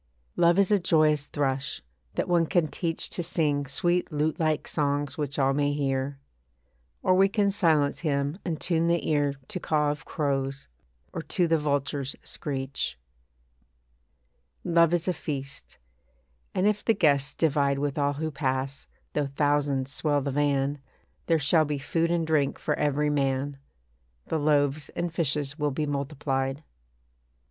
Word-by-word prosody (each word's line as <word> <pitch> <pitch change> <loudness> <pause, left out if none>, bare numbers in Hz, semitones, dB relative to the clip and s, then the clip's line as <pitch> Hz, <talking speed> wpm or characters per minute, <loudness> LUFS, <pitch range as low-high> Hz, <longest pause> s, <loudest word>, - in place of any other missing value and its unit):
Love 170 +1 +4
is 200 0 +3
a 205 - +5
joyous 155 -4 +3
thrush, 135 - -2 0.3
that - - -1
one 170 -2 +3
can 175 -3 +2
teach 165 +1 +1
To - - -3
sing 150 -4 0
sweet 175 +5 0
lute 155 +3 0
like 155 -2 0
songs 145 -1 0
which 145 -2 -3
all 135 -1 +3
may 145 0 +1
hear. 135 -1 -1 0.9
Or 185 - +4
we 195 +1 +5
can 200 0 +2
silence 160 -7 +2
him 145 +1 -1
and 165 -4 -3
tune 165 -1 +1
the 170 0 +1
ear 145 -2 +1
To 185 - -3
caw 150 -3 +1
of 145 -2 -6
crows, 135 -2 -2 0.5
or - - -3
to 170 +3 0
the 165 -1 +3
vulture's 140 -2 -1
screech. 135 - -4 1.7
Love 170 -2 +4
is 175 0 0
a 185 - +2
feast; 140 -5 -6 0.8
and 185 - +2
if 210 0 +1
the 225 - +3
guests 140 -6 +2
divide 140 -3 +2
With 145 +1 -2
all 145 0 +2
who 155 +2 -3
pass, 135 -1 -2 0.3
though 145 -1 0
thousands 140 -1 0
swell 145 -2 +1
the 140 +1 -2
van, 145 0 +1 0.5
There 165 - +4
shall 155 +2 +3
be 145 -1 -2
food 165 +4 0
and 170 -1 +1
drink 150 -3 +1
for - - -1
every 150 0 +1
man; 135 0 -1 0.7
The 160 - -1
loaves 145 0 +1
and 170 -1 -2
fishes 150 -2 -1
will 150 0 +1
be 150 +2 -2
multiplied. 140 -1 -2
145 Hz, 155 wpm, -27 LUFS, 140-165 Hz, 1.7 s, a